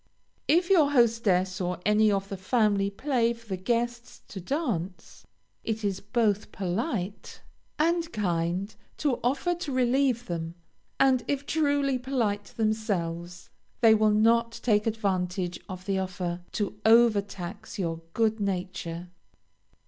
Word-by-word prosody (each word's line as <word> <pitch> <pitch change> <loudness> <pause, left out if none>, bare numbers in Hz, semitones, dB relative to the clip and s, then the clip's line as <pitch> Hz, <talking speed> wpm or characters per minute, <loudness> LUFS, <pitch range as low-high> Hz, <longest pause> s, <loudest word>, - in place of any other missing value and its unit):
If 345 +4 +3
your 315 -7 +5
hostess 210 -6 +2
or 180 -1 -2
any 210 0 +4
of 195 -1 -1
the 195 - -4
family 200 0 +1
play 235 +1 0
for 230 0 -17
the 190 - -1
guests 235 +5 -2
to 190 - -7
dance, 195 - -4 0.4
it 220 -1 -3
is 195 -2 -1
both 210 -1 0
polite 200 - -3 0.3
and 335 +1 +1
kind 180 0 -1 0.2
to 280 -5 0
offer 275 +8 +1
to 345 -4 -5
relieve 255 -1 +2
them; 165 -1 -4 0.4
and 265 -2 +4
if 285 0 -1
truly 285 -4 +1
polite 230 -6 -1
themselves, 180 -6 -3 0.3
they 225 -2 +7
will 215 0 +4
not 230 +2 +3
take 210 -2 +2
advantage 185 -4 -1
of 185 -1 -7
the 195 -1 0
offer, 180 -2 -3
to 205 0 -3
over 225 -2 +6
tax 200 +2 -8
your 165 -4 -2
good 220 -1 +2
nature. 180 -3 -3
215 Hz, 135 wpm, -27 LUFS, 185-240 Hz, 0.4 s, they